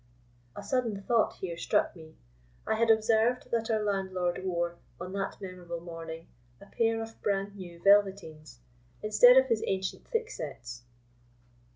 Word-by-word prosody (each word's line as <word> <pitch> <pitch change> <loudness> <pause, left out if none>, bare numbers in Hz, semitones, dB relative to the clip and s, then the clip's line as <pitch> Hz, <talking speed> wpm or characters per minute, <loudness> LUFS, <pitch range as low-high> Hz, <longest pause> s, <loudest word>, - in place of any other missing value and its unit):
A - - -7
sudden 220 -3 -1
thought 230 +1 +2
here 170 -3 -6
struck - - +1
me. 160 -2 -13 0.5
I - - +1
had 230 +1 +1
observed 225 +2 +3
that 230 -1 0
our 220 -1 +1
landlord 190 -3 -1
wore, 175 -2 -2 0.2
on 180 +2 -6
that 195 0 -3
memorable 180 -3 -7
morning, 165 -1 -8 0.3
a - - -14
pair 225 +1 0
of 225 0 -12
bran 200 0 -1
new 175 -3 -10
velveteens 190 -9 +2 0.5
instead 245 +4 +7
of 265 - +7
his 230 -4 0
ancient 190 -1 -3
thicksets. 145 - -5
195 Hz, 145 wpm, -29 LUFS, 175-225 Hz, 0.5 s, instead